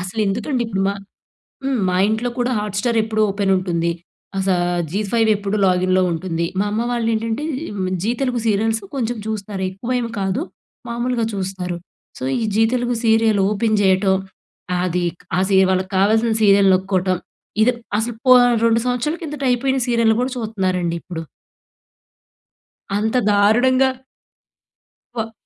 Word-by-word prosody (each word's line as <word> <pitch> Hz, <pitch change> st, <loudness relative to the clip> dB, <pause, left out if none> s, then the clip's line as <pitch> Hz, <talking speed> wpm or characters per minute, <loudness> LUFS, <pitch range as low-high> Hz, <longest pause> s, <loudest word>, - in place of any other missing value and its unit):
అసలు 185 Hz, +4 st, -4 dB
ఎందుకండి 245 Hz, +6 st, -1 dB
ఇప్పుడు 195 Hz, -3 st, -2 dB
మా 200 Hz, -, -1 dB, 0.7 s
హ్మ్. 270 Hz, -2 st, 0 dB
మా 180 Hz, -, 0 dB
ఇంట్లో 220 Hz, +3 st, 0 dB
కూడా 245 Hz, +1 st, +1 dB
హాట్ 210 Hz, -1 st, -3 dB
స్టార్ 235 Hz, -1 st, 0 dB
ఎప్పుడు 215 Hz, -1 st, -1 dB
ఓపెన్ 195 Hz, 0 st, 0 dB
ఉంటుంది. 170 Hz, -2 st, -1 dB, 0.5 s
అస 190 Hz, 0 st, -1 dB, 0.4 s
జీ 200 Hz, -, -1 dB
ఫైవ్ 225 Hz, -2 st, +3 dB
ఎప్పుడు 200 Hz, +1 st, -2 dB
లాగిన్‌లో 185 Hz, 0 st, +2 dB
ఉంటుంది. 170 Hz, 0 st, -2 dB
మా 205 Hz, -, +1 dB
అమ్మ 220 Hz, +2 st, 0 dB
వాళ్ళు 235 Hz, -2 st, -1 dB
ఏంటంటే, 225 Hz, +5 st, -2 dB, 0.3 s
ఆహ్, 185 Hz, -2 st, -2 dB
జీ 225 Hz, -, +1 dB
తెలుగు 250 Hz, -3 st, 0 dB
సీరియల్స్ 220 Hz, +1 st, +1 dB
కొంచెం 240 Hz, -2 st, -2 dB
చూస్తనారు. 200 Hz, -3 st, -4 dB
ఎక్కువ 235 Hz, +6 st, -6 dB
ఏమి 235 Hz, -1 st, -3 dB
కాదు. 195 Hz, +7 st, -1 dB, 0.5 s
మామూలుగా 240 Hz, 0 st, -1 dB
చూస్తారు. 185 Hz, -2 st, -3 dB, 0.4 s
సో, -, -, -6 dB, 0.2 s
ఈ -, -, 0 dB
జీ 225 Hz, -, +4 dB
తెలుగు 245 Hz, -1 st, 0 dB
సీరియల్ 220 Hz, -2 st, +3 dB
ఓపెన్ 215 Hz, 0 st, +1 dB
చేయటం, 190 Hz, 0 st, +3 dB, 0.7 s
అదిక్ 175 Hz, -1 st, -2 dB
ఆ -, -, +3 dB
సీయ 190 Hz, -1 st, +5 dB
వాళ్ళకి 185 Hz, +1 st, -1 dB
కావాల్సిన 220 Hz, +4 st, +3 dB
సీరియల్ 200 Hz, -1 st, +5 dB
నొక్కోటం. 185 Hz, -1 st, +1 dB, 0.4 s
ఇదేప్ 240 Hz, +1 st, +3 dB, 0.2 s
అసలు 230 Hz, +1 st, -3 dB
పోన్ 250 Hz, -1 st, +7 dB, 0.2 s
2 230 Hz, 0 st, +3 dB
సంవత్సరాల 250 Hz, +7 st, -1 dB
కిందట 295 Hz, -2 st, -5 dB
అయిపోయిన, 265 Hz, +2 st, +1 dB
సీరియల్‌లు 230 Hz, -2 st, +3 dB
కూడా, 255 Hz, +1 st, -1 dB
చూత్నారండి, 185 Hz, -6 st, -1 dB
ఇప్పుడు. 165 Hz, -2 st, -6 dB, 1.8 s
అంత 220 Hz, +4 st, 0 dB
దారుణంగా 245 Hz, +6 st, +4 dB, 1.2 s
వ 225 Hz, -1 st, -3 dB
215 Hz, 145 wpm, -20 LUFS, 190-235 Hz, 1.8 s, పోన్